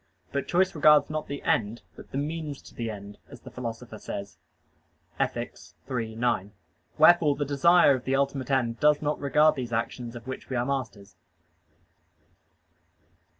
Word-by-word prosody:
But 140 -1 -2
choice 185 +2 +2
regards 150 -2 +5
not 155 0 -3
the 140 0 -6
end, 110 +1 0
but - - -13
"the - - -5
means 150 0 -3
to - - -14
the 115 -1 -4
end," 100 -1 -9
as - - -12
the - - -12
Philosopher 115 -2 -7
says 100 0 -7 0.8
(Ethic. - - -2 0.4
iii, 115 -3 -3
9). 110 -4 -1 0.4
Wherefore 165 -5 +6
the 145 - -2
desire 145 +3 +5
of 130 -2 -4
the 135 - +1
ultimate 135 -2 -1
end 120 -4 0
does 150 0 +3
not 150 0 -1
regard 150 +2 +4
those 125 -2 -4
actions 115 +1 -3
of 120 - -9
which 130 0 -7
we 130 - -3
are 120 0 0
masters. 115 -8 -4
130 Hz, 160 wpm, -27 LUFS, 115-150 Hz, 0.8 s, Wherefore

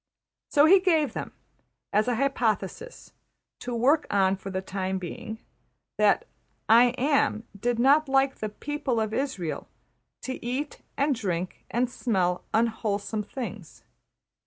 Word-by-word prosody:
So 290 0 +5
he 380 +4 +7
gave 320 - +2
them, - - -5 0.6
as 210 +3 +3
an 245 - +1
hypothesis 250 - -2 0.5
to 245 -1 -4
work 275 +7 +3
on 195 -1 +3
for 195 0 -8
the 185 -1 -2
time 190 0 -2
being, 220 +5 -6 0.6
that - - +4 0.4
``I 240 +2 +6
Am'' 275 -5 +2
did 235 +4 -1
not 280 +4 +4
like 270 0 +2
the 215 - -3
\emph{people 270 +1 -2
of 215 - -4
Israël} 220 - -3 0.6
to 260 - -5
eat 260 +5 -3 0.2
and 280 +1 +2
drink 185 -7 -3
and 245 +2 +1
smell 185 -8 0
unwholesome 220 -2 0
things. 210 - -7
235 Hz, 135 wpm, -27 LUFS, 200-275 Hz, 0.6 s, he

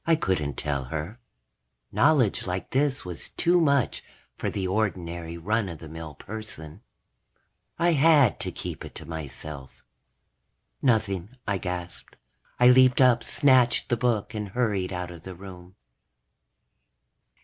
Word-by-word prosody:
I 165 - +5
couldn't 90 - -1
tell 70 -3 -2
her. 80 - -5 0.7
Knowledge 140 -12 +3
like 90 +1 -4
this 135 -2 +1
was 90 -2 -4
too 175 0 +2
much 140 -5 +2 0.3
for - - -2
the 95 -2 -2
ordinary 85 -5 -2
run 105 +4 0
of 85 - -7
the 80 - -10
mill 80 -1 -8
person. 95 -3 -8 1.0
I 175 +1 +3
had 150 -5 +5
to - - -2
keep - - -6
it - - -10
to - - -7
myself. 75 -4 -8 1.0
"Nothing," 110 -2 0
I 100 -2 0
gasped. 90 -1 -6 0.4
I 125 0 +7
leaped 130 0 +6
up, 125 -3 +5
snatched 130 -4 +3
the 120 - +3
book, 115 -3 0
and 105 -2 -4
hurried 100 -4 -1
out 90 -1 -4
of 85 -2 -11
the 95 +1 -9
room. 90 0 -12
100 Hz, 140 wpm, -26 LUFS, 85-125 Hz, 1.0 s, I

